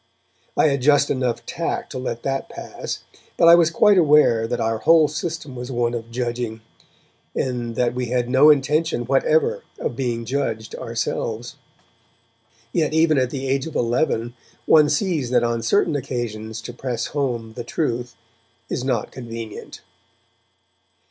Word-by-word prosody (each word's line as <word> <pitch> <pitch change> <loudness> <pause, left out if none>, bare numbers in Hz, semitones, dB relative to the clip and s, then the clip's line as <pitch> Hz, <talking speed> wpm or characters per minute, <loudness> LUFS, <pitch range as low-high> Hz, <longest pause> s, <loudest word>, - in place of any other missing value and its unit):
I 155 - +5
had 140 -1 -1
just 145 +1 +4
enough 125 -3 -1
tact - - -3
to - - -4
let 120 -2 -4
that 135 0 -2
pass, - - -7 0.3
but 170 - +5
I 170 - +10
was 170 -1 +6
quite 200 +4 +4
aware 145 -8 +4
that 120 - -2
our 115 0 0
whole 160 +2 +5
system 155 -2 -5
was 125 +1 -6
one 120 -1 0
of 115 -1 -5
judging, 120 -2 -3 0.7
and 120 -3 -2
that 120 0 +1
we 125 0 -2
had 125 0 0
no 135 +4 +6
intention 150 -2 +2
whatever 140 +5 +2 0.2
of - - -3
being 120 -2 -2
judged 115 -4 -2
ourselves. 115 0 -3 1.2
Yet 155 -2 +1
even 160 -3 +4
at 130 -1 +1
the 135 +1 -4
age 135 +2 0
of 160 - -9
eleven 120 -1 0 0.3
one 150 -2 +6
sees 150 -4 0
that 125 - +3
on 115 -1 0
certain 170 - +2
occasions 115 -4 -4
to 120 - -7
press 120 -2 -3
home 120 -6 -2
the 120 - -6
truth 120 -2 -2 0.6
is 125 - -2
not 125 -5 -1
convenient. 115 -3 -8
125 Hz, 155 wpm, -22 LUFS, 120-145 Hz, 1.2 s, I